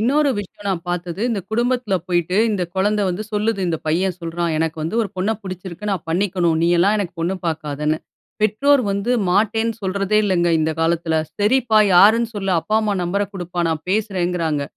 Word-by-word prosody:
இன்னொரு 280 Hz, +6 st, +2 dB
விஷயம் 205 Hz, 0 st, -8 dB
நான் 180 Hz, -4 st, -1 dB
பார்த்தது, 175 Hz, +1 st, -3 dB
இந்த 215 Hz, -4 st, -1 dB
குடும்பத்துல 240 Hz, -2 st, 0 dB
போயிட்டு 175 Hz, +1 st, 0 dB
இந்த 200 Hz, -4 st, -1 dB
குழந்த 205 Hz, +2 st, +1 dB
வந்து 180 Hz, +4 st, -2 dB
சொல்லுது. 210 Hz, -1 st, 0 dB
இந்த 165 Hz, -, 0 dB
பையன் 180 Hz, +3 st, 0 dB
சொல்றான். 170 Hz, 0 st, -2 dB
எனக்கு 160 Hz, 0 st, -1 dB
வந்து 165 Hz, +9 st, -2 dB
ஒரு 210 Hz, -, -3 dB
பொண்ண 185 Hz, +4 st, 0 dB
புடிச்சிருக்கு 185 Hz, +1 st, -6 dB
நான் 180 Hz, -5 st, -4 dB
பண்ணிக்கணும். 175 Hz, -2 st, +1 dB
நீயெல்லாம் 175 Hz, +5 st, +3 dB
எனக்கு 180 Hz, -3 st, -3 dB
பொண்ணு 175 Hz, +3 st, 0 dB
பார்க்காதன்னு. 150 Hz, -1 st, -2 dB, 0.4 s
பெற்றோர் 255 Hz, +6 st, +3 dB
வந்து 200 Hz, +5 st, -2 dB, 0.2 s
மாட்டேன்னு 220 Hz, +3 st, +1 dB
சொல்றதே 195 Hz, +2 st, 0 dB
இல்லங்க. 175 Hz, -3 st, +2 dB
இந்த 160 Hz, +1 st, +1 dB
காலத்துல 165 Hz, 0 st, 0 dB, 0.2 s
சரிப்பா 225 Hz, +1 st, +3 dB, 0.2 s
யாருன்னு 220 Hz, +5 st, +6 dB
சொல்ல 195 Hz, -1 st, -2 dB
அப்பா, 215 Hz, +7 st, 0 dB
அம்மா 210 Hz, -2 st, 0 dB
நம்பர்ர 200 Hz, +4 st, 0 dB
குடுப்பா, 175 Hz, -1 st, -4 dB
நான் 160 Hz, -1 st, -3 dB
பேசுறங்குறாங்க. 180 Hz, -7 st, 0 dB
190 Hz, 165 wpm, -20 LUFS, 170-210 Hz, 0.4 s, யாருன்னு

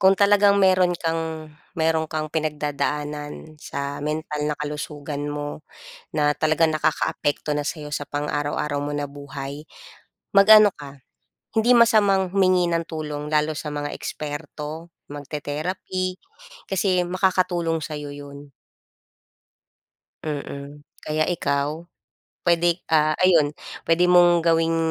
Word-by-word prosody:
kung 190 Hz, 0 st, +5 dB
talagang 200 Hz, 0 st, +5 dB
meron 185 Hz, -2 st, +4 dB
kang 160 Hz, -2 st, -3 dB, 0.2 s
meron 160 Hz, -1 st, +1 dB
kang 155 Hz, 0 st, -4 dB
pinagdadaanan 150 Hz, 0 st, -3 dB
sa 140 Hz, 0 st, -5 dB
mental 150 Hz, 0 st, -3 dB
na 150 Hz, -, -2 dB
kalusugan 150 Hz, 0 st, -5 dB
mo 145 Hz, 0 st, -5 dB, 0.5 s
na 150 Hz, -1 st, +1 dB
talagang 155 Hz, +2 st, +2 dB
nakakaapekto 150 Hz, -1 st, 0 dB
na 145 Hz, -, -1 dB
sa'yo 150 Hz, 0 st, -4 dB
sa 145 Hz, -, -2 dB
pang 145 Hz, +1 st, -4 dB
araw-araw 145 Hz, 0 st, -1 dB
mo 145 Hz, -, -3 dB
na 145 Hz, 0 st, -2 dB
buhay, 140 Hz, 0 st, -8 dB, 0.7 s
mag-ano 215 Hz, +1 st, +9 dB
ka 140 Hz, -2 st, -11 dB, 0.6 s
hindi 235 Hz, +3 st, +5 dB
masamang 205 Hz, -5 st, +4 dB
humingi 185 Hz, -2 st, +3 dB
ng 165 Hz, 0 st, 0 dB
tulong 150 Hz, -2 st, -5 dB
lalo 150 Hz, 0 st, +1 dB
sa 150 Hz, -1 st, -5 dB
mga 145 Hz, 0 st, -3 dB
eksperto, 150 Hz, +2 st, -6 dB, 0.2 s
magte-therapy, 155 Hz, +6 st, -4 dB, 0.6 s
kasi 185 Hz, -1 st, +2 dB
makakatulong 175 Hz, -2 st, 0 dB
sa'yo 150 Hz, -2 st, -6 dB
yun. 145 Hz, 0 st, -11 dB, 1.7 s
Mm, 145 Hz, -1 st, -6 dB, 0.2 s
kaya 155 Hz, +1 st, 0 dB
ikaw, 150 Hz, -1 st, -1 dB, 0.6 s
pwede, 175 Hz, 0 st, +2 dB
ah, 155 Hz, -1 st, +4 dB
ayun, 160 Hz, -5 st, +4 dB, 0.3 s
pwede 165 Hz, +2 st, +3 dB
mong 175 Hz, -1 st, +6 dB
gawing 165 Hz, 0 st, +2 dB
155 Hz, 115 wpm, -23 LUFS, 145-175 Hz, 1.7 s, mag-ano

